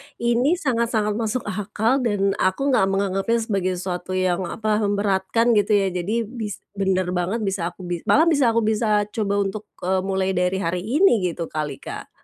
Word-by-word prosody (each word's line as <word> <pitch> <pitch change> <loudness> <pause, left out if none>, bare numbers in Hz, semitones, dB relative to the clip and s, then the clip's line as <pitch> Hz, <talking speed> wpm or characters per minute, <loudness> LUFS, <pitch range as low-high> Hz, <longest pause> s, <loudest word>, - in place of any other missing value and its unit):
ini 240 +7 +2
sangat-sangat 235 - 0
masuk 225 +2 -1
akal 210 +6 0
dan 205 -5 +1
aku 230 +10 +1
nggak 195 -7 +3
menganggapnya 195 +3 0
sebagai 195 -4 -1
sesuatu 180 0 -4
yang, 185 -1 0
apa, 215 +1 -1
memberatkan, 205 +2 +1
gitu 205 -2 +2
ya. 195 -2 +2
Jadi 195 +6 -1
bis 220 -2 -6
benar 190 -2 0
banget 185 +5 -1
bisa 195 -4 -1
aku 180 +1 -9
bi 175 -1 -3
malah 310 - +5
bisa 280 -9 +3
aku 230 - +3
bisa 215 -1 +2
coba 205 -2 -1
untuk, 205 +2 -5 0.2
eee, 185 +1 +1
mulai 190 0 -1
dari 180 0 0
hari 170 +2 -1
ini, 245 - +3
gitu 170 -1 -5
kali, 150 -2 -3
Kak. - - -10
200 Hz, 175 wpm, -22 LUFS, 185-230 Hz, 0.2 s, malah